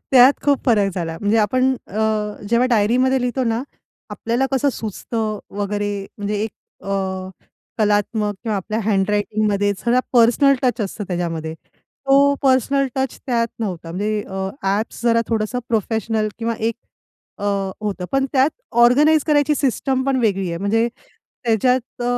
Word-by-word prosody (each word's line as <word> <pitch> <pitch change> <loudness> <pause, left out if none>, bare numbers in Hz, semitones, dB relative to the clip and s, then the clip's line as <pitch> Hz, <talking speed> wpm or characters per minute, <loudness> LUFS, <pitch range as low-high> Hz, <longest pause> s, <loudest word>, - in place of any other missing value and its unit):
त्यात 255 +1 +8
खूप 285 -2 +3
फरक 205 -5 +3
झाला. 165 -3 -3
म्हणजे 205 +2 +2
आपण 255 +5 +2
अ, 205 - -6 0.5
जेव्हा 235 +3 +3
डायरीमध्ये 245 +4 +3
लिहितो 250 +1 -1
ना, 230 +1 0 0.5
आपल्याला 240 +4 -1
कसं 275 +2 +2
सुचतं 220 0 -4 0.2
वगैरे, 205 0 -2 0.2
म्हणजे 205 +1 -2
एक 220 - -2 0.3
अ, 195 - -5 0.9
कलात्मक 210 0 +1
किंवा 220 -4 -1
आपल्या 215 +3 -3
हँडरायटिंगमध्ये 205 0 +1
सगळा 245 +1 +2
पर्सनल 245 +4 +5
टच 245 -1 +1
असतं, 205 +1 -3
त्याच्यामध्ये 165 -3 -3 0.5
तो 280 +1 +5
पर्सनल 275 +1 +3
टच 265 -1 -2
त्यात 235 -3 +1
नव्हता. 180 -7 -4
म्हणजे 210 +4 -1
अ, 190 0 -3
ॲप्स 200 +5 -1
जरा 230 -1 +4
थोडंसं 225 +2 -1
प्रोफेशनल 220 0 0
किंवा 230 0 -1
एक 225 +1 0 0.6
अ, - - -5 0.4
होतं, 205 -3 -3
पण 270 0 +2
त्यात 270 +1 +4 0.3
ऑर्गनाइज 300 +5 +5
करायची 300 -1 +3
सिस्टम 265 -1 0
पण 270 - +2
वेगळी 195 -5 +1
आहे. 170 0 -3
म्हणजे 225 +5 +1 0.6
त्याच्यात 245 +2 +1
अ, - - -2
225 Hz, 145 wpm, -20 LUFS, 205-255 Hz, 0.9 s, त्यात